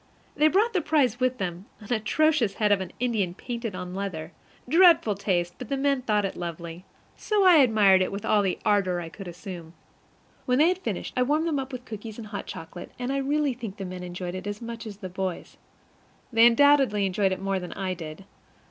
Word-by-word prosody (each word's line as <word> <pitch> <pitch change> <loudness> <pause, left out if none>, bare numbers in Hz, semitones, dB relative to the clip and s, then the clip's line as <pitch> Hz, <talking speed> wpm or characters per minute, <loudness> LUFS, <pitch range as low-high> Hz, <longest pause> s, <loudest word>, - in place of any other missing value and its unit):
They 305 - +4
brought 420 +8 +2
the 370 - +1
prize 285 -7 +1
with 255 0 +1
them 180 -1 -5
an 215 +3 -4
atrocious 240 -1 +1
head 210 -1 +1
of 200 -2 +3
an 190 - -6
Indian 215 -8 0
painted 235 -4 -5
on 180 -1 -6
leather. 180 -4 -5 0.4
Dreadful 330 - +5
taste; 180 -3 -1
but 250 - -7
the 275 - -1
men 275 -1 +1
thought 210 -4 +1
it 195 - -4
lovely, 170 +1 -7 0.3
so 420 -2 +1
I 360 -3 +8
admired 215 -8 +5
it 185 - 0
with 200 +1 -5
all 210 - +3
the 190 -2 -1
ardor 195 -4 +2
I 165 -1 -6
could 195 +3 -10
assume. 175 -2 -9 0.7
When 250 0 +3
they 310 +4 +5
had 365 0 -1
finished, - - -4
I 250 - +1
warmed 300 +5 +2
them 300 -4 0
up 270 0 -5
with 250 -1 -7
cookies 220 -1 -8
and 230 - -7
hot 205 -1 -6
chocolate, 165 +2 -8
and 250 +2 -3
I - - 0
really 285 0 0
think 230 -5 -8
the 195 - -5
men 180 0 -7
enjoyed 180 0 -5
it 185 +2 -6
as 205 0 -4
much 230 -1 -7
as 205 -2 -8
the 195 -2 -7
boys; 185 -1 -5 0.8
they 230 +1 +7
undoubtedly 255 -5 +4
enjoyed 195 +1 +1
it 185 - -2
more 195 0 -1
than 180 -1 -7
I 190 -2 -3
did. 165 +1 -9
210 Hz, 220 wpm, -26 LUFS, 185-255 Hz, 0.8 s, I